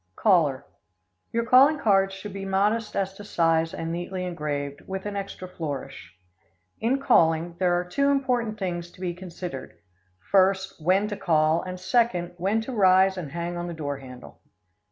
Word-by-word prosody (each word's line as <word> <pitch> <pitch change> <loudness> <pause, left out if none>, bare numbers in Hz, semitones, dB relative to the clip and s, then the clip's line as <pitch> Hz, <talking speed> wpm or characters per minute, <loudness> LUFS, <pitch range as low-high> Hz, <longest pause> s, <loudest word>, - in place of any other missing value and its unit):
Caller 150 -10 +2 0.7
Your 230 0 0
calling 270 +6 +6
cards 195 -6 +2
should 195 +1 -8
be 195 0 -6
modest 210 +3 0
as 195 -1 -1
to 205 - -11
size 165 -4 +1
and 165 0 -4
neatly 180 +2 -4
engraved, 145 -4 -4
with 190 0 -5
an 205 -1 -4
extra 195 -2 -5
flourish. 145 - -7 0.6
In 250 +5 +1
calling, 170 - +3
there 175 -1 +2
are 180 - -4
two 280 +10 +1
important 250 -6 0
things 175 -3 -3
to - - -18
be 180 -2 -2
considered: 175 -6 -8 0.5
First, 190 -2 +2
when 190 +5 +3
to 205 - -3
call, 160 -3 +2
and, 185 0 -6
second, 185 -3 +1
when 200 +5 0
to 245 - -6
rise 190 -2 +5
and 165 -7 -6
hang 170 +2 -4
on 175 0 -4
the 170 - -5
door 145 -3 -4
handle. 125 -2 -12
185 Hz, 170 wpm, -25 LUFS, 165-200 Hz, 0.7 s, calling